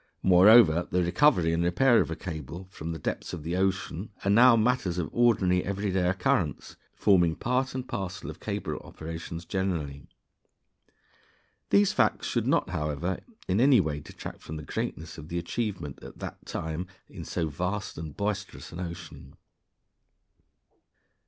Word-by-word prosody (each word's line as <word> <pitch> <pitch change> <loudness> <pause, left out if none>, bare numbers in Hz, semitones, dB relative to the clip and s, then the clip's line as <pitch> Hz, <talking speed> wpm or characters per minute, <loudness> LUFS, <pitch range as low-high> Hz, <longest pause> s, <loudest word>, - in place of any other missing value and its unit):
Moreover, 95 -2 +7
the 90 0 +1
recovery 85 - +3
and 85 +1 +1
repair 115 +8 +4
of - - -2
a 80 - -3
cable 80 +1 -7
from 80 -2 -6
the 80 - -4
depths 75 - -4
of 75 - -6
the 85 +3 -2
open 95 +1 +3
ocean 95 0 -4 0.2
are 100 - +3
now 120 +3 +7
matters 110 -6 +1
of 90 - -2
ordinary 95 -7 +3
every 100 +1 -2
day 90 -1 +1
occurrence, 95 0 0 0.2
forming 90 -5 +3
part 130 +2 -1
and 130 -1 -4
parcel 95 -2 -5
of - - -7
cable - - -3
operations 80 +1 -7
generally. 85 -7 -3 1.6
These 100 0 +4
facts - - +2
should - - -1
not, - - +2
however, 75 +2 -2 0.3
in 95 +5 +2
any 135 -2 +6
way 75 -5 -1
detract - - -9
from 80 - -7
the 75 - -7
greatness 80 +2 -5
of 75 - -9
the 85 - -3
achievement 85 - -3
at - - -11
that - - -8
time 80 +3 -4 0.2
in - - -9
so 85 -2 -2
vast 90 +7 -3
and 80 -2 -7
boisterous 100 -1 -3
an 85 - -8
ocean. 85 -5 -8
90 Hz, 160 wpm, -28 LUFS, 80-100 Hz, 1.6 s, Moreover